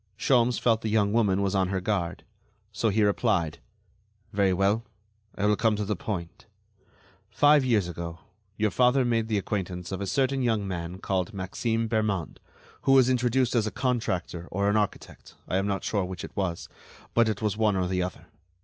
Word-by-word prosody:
Sholmes 120 0 +3
felt 115 -2 +2
the 110 - -2
young 105 -1 +2
woman 100 -4 +2
was 100 0 0
on 95 -2 +2
her 95 0 -1
guard, 95 -3 -2 0.5
so 115 - 0
he 105 +1 +2
replied: 100 -6 +1 0.7
"Very 100 -2 +3
well; 100 +4 +1 0.5
I 100 - -1
will 105 0 +4
come 110 0 +2
to 105 0 -2
the 105 +1 -1
point. 85 -3 -6 0.8
Five 145 +6 +5
years 110 -8 +2
ago 85 -1 -6 0.4
your 110 -1 +1
father 125 +4 +3
made 115 -2 +1
the 110 -2 0
acquaintance 90 -3 -3
of 95 - -4
a 100 - -3
certain 135 +3 +1
young 110 -5 0
man 90 -1 -4
called 95 +1 -2
Maxime 115 +4 -1
Bermond, 105 -7 -1 0.4
who 135 - +3
was 130 -1 +6
introduced 125 0 +1
as 115 -3 +2
a - - -3
contractor 95 -9 -2
or 100 +2 +1
an - - 0
architect, 105 -2 -3
I 95 - 0
am 95 +1 0
not 100 -1 -2
sure 100 -3 0
which 90 -1 -6
it - - -9
was; 90 -4 -2 0.5
but 115 -1 +4
it 110 0 -3
was 105 -2 0
one 105 -2 +2
or 95 -1 0
the 90 0 -1
other. 90 -1 -5
105 Hz, 190 wpm, -27 LUFS, 95-115 Hz, 0.8 s, was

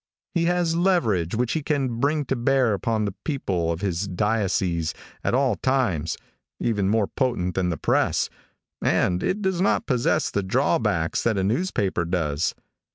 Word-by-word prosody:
He 170 -2 +1
has 175 -1 +1
a 165 - 0
leverage 115 - +2
which 120 +1 0
he 160 - 0
can 135 -6 -1
bring 145 +2 +1
to 135 - -1
bear 125 -1 +2
upon 110 +2 0
the 100 - -3
people 95 - -1
of 85 +1 -4
his 95 0 -1
diocese 95 -4 0 0.3
at - - +1
all 130 -5 +2
times, 100 - 0 0.4
even 100 -4 0
more 110 0 +3
potent 95 -8 -1
than 90 0 0
the 85 - -2
press, - - +1 0.5
and 90 0 +2
it 205 +3 -1
does 190 -2 0
not 200 +3 +2
possess 145 +4 +1
the 100 - 0
drawbacks 85 -3 +1
that 110 -3 +1
a 95 - +1
newspaper 105 - 0
does. 80 -3 -1
110 Hz, 165 wpm, -24 LUFS, 90-140 Hz, 0.5 s, more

